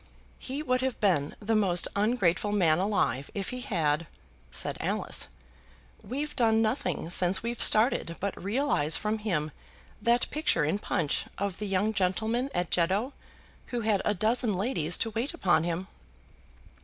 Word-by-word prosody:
"He 275 +3 -5
would 255 -3 +1
have 260 -1 -2
been 160 -8 +1
the 220 +1 -1
most 185 -5 +3
ungrateful 205 -2 +1
man 175 -6 +3
alive 185 -9 0
if 195 -2 -3
he 250 0 -5
had," 165 - 0 0.4
said - - 0
Alice. - - -1 0.7
"We've 285 +6 -4
done 225 -2 +3
nothing 220 - -1
since 180 +2 +3
we've 235 0 -3
started 215 -7 +4
but 200 -2 -4
realize 200 - +1
from 215 0 -2
him 170 -8 -1 0.5
that 235 +3 +2
picture 295 - +1
in 175 +7 0
'Punch' 165 -8 0
of 200 -2 -3
the 210 - -3
young 200 +3 0
gentleman 220 +7 0
at 175 -1 -1
Jeddo 195 +10 +1 0.5
who 240 -1 -3
had 210 -3 +1
a 210 - +1
dozen 220 +2 +1
ladies 180 - +1
to 225 - -1
wait 240 +9 -2
upon 175 - +2
him." 175 +2 -3
205 Hz, 155 wpm, -28 LUFS, 175-235 Hz, 0.7 s, started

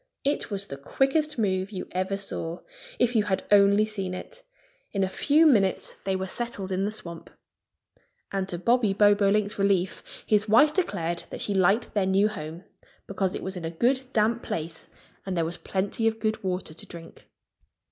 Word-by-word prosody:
It 285 +2 0
was 200 -2 -1
the 140 - -7
quickest 275 - 0
move 190 -3 0
you 195 -3 -6
ever 185 +2 -1
saw 175 -4 -3 0.4
if 245 0 +2
you 215 -2 +3
had 190 -2 -1
only 200 +1 +6
seen 195 -4 -4
it! - - -9 0.5
In 195 -2 +1
a - - +2
few 295 +11 +3
minutes 205 -11 +3
they 190 -1 0
were 190 0 -2
settled 200 -2 -4
in 190 +1 0
the 210 - -1
swamp. 170 -6 -8 1.0
And 195 -1 -2
to 175 - -2
Bobby 230 +2 +2
Bobolink's 205 0 +3
relief 195 -2 -1
his 210 0 +2
wife 295 +8 +6
declared 175 - -1
that - - -6
she 205 - 0
liked 195 +4 +2
their 200 -3 +1
new 195 +2 +3
home, 165 -3 -7 0.4
because 190 -1 -2
it - - -5
was 190 +1 -4
in 180 - -6
a 165 - -2
good 250 +10 0
damp 225 +1 +2
place 160 -4 -5 0.3
and 190 -2 -3
there 165 - +1
was 170 +2 -4
plenty 200 +4 -1
of 220 0 0
good 220 -1 -1
water 180 -3 -3
to 160 - -9
drink. 165 -1 -12
200 Hz, 185 wpm, -26 LUFS, 185-220 Hz, 1.0 s, only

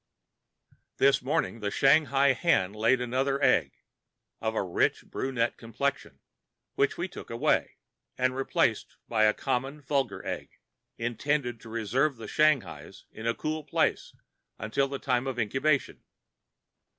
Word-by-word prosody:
This 135 0 +4
morning 125 -3 -1
the 105 -1 -2
Shanghai 140 +2 +4
hen 105 - +1
laid 115 +4 +2
another 135 +3 0
egg, - - +3 0.7
of 110 0 -1
a - - +1
rich 90 -2 0
brunette 125 -3 -2
complexion, 115 - -3 0.5
which - - +1
we - - -2
took - - -10
away, - - +1 0.4
and 130 0 +1
replaced 135 0 0
by 110 -2 +3
a 105 - +4
common 135 +2 -2
vulgar 135 -6 -2
egg, - - -4 0.5
intending 120 +1 -1
to 115 - -12
reserve 120 +6 0
the 110 -1 -8
Shanghai's 150 +1 0
in 110 +1 -6
a 115 - +1
cool 155 0 -3
place - - 0 0.4
until 110 +6 0
the 140 0 -4
time 130 -2 0
of 130 -2 -3
incubation. 130 +6 0
130 Hz, 135 wpm, -28 LUFS, 115-140 Hz, 0.7 s, This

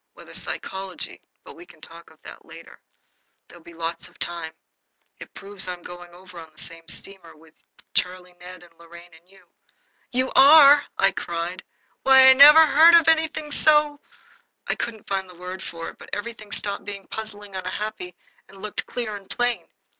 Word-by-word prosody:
Whether - - -15
psychology 190 -1 -4 0.2
but - - -13
we - - -13
can - - -19
talk 170 +1 -14
of 160 - -23
that - - -13
later. - - -15 0.7
There'll 175 -1 -17
be 170 0 -15
lots 165 0 -5
of - - -22
time. 170 -2 -4 0.7
It - - -12
proves 195 -1 -9
I 180 - -3
am 175 -1 -13
going 175 0 -11
over 180 0 -14
on 160 -1 -13
the 155 - -33
same 165 0 -11
steamer 185 0 -8
with 160 +1 -22 0.4
Charlie 180 0 -3
Ned 180 0 -12
and 170 -1 -20
Lorraine 170 +1 -15
and 165 +2 -21
you." 195 0 -22 0.7
"You 255 +1 -1
are!" 285 0 +7
I 195 0 +3
cried. 175 +1 -5 0.4
"Why, 265 0 +7
I - - +7
never 300 +4 +9
heard 320 +3 +6
of 335 -2 +4
anything 315 -2 0
so 300 -1 +3 0.3
" - - -33
I - - 0
couldn't 220 -3 -7
find 190 -1 -3
the 180 - -15
word 180 +2 -8
for 165 -3 -7
it, - - -26
but - - -14
everything 215 0 -7
stopped 200 -1 -3
being 200 -1 -8
puzzling 205 -2 -9
and 185 - -5
unhappy 185 -1 -6 0.3
and 195 0 -16
looked 210 +1 -6
clear 235 -4 -5
and 195 -1 -12
plain. 245 -1 -2
195 Hz, 185 wpm, -23 LUFS, 175-245 Hz, 0.7 s, never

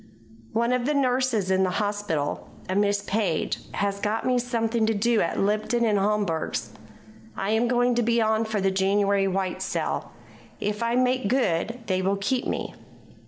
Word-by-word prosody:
"One 235 +2 +1
of 250 0 0
the 300 - +1
nurses 255 -7 +1
in 190 0 +3
the 190 - +2
hospital, 205 -8 -2 0.2
a 185 - -2
Miss 200 0 +1
Page, 200 -5 -1 0.2
has 200 0 -1
got 210 +2 -1
me 250 -1 +2
something 230 -2 0
to 225 - +1
do 230 +2 +2
at 165 - -1
Lipton 215 +4 +1
and 210 -3 +2
Homburg's. 200 -5 -1 0.7
I 195 +2 -1
am 225 +2 +2
going 245 0 +2 0.2
on 220 0 +2
for 220 -1 -2
the 195 0 +1
January 195 +1 +2
white 190 -1 -2
sale. - - -2 0.5
If 210 +1 -2
I 235 +1 +1
make 255 -2 +2
good 230 -1 0
they 185 -3 0
will 195 +1 +1
keep 245 +6 -1
me." - - -3
210 Hz, 165 wpm, -25 LUFS, 195-235 Hz, 0.7 s, in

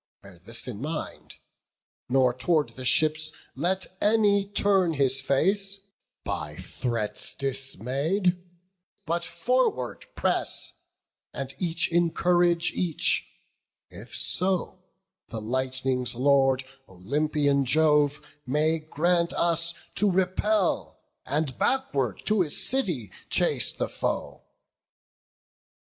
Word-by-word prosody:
bear 95 -3 -14
this 115 +8 -3
in 115 -3 -6
mind, 150 +2 -5 0.7
Nor 130 -1 +3
tow'rd 150 +4 +1
the 130 - -8
ships 155 +3 +3 0.2
let 180 +7 0 0.2
any 205 -2 +3
turn 195 -4 +2
his 135 -2 +3
face, 195 +9 0 0.4
By 75 -1 -4
threats 110 +5 -4
dismay'd; 135 - -1 0.7
but 170 +2 -1
forward 170 - -1
press, - - 0 0.6
and 135 -1 -4
each 170 -2 0
Encourage 175 0 +2
each, 170 -4 +1 0.6
if - - -9
so 185 0 +1 0.5
the 115 - -5
lightning's 130 +1 -1
Lord, 135 0 +3 0.2
Olympian 140 +8 0
Jove, 150 +1 +3 0.2
may 155 +4 +1
grant 170 +3 0
us 170 0 +2 0.2
to 205 +1 +3
repel, 190 +2 0 0.3
And 145 -2 -2
backward 140 - 0
to 215 -2 +2
his 155 -5 0
city 175 - 0 0.2
chase - - +2
the - - -3
foe." - - -3
155 Hz, 100 wpm, -26 LUFS, 130-180 Hz, 0.7 s, Nor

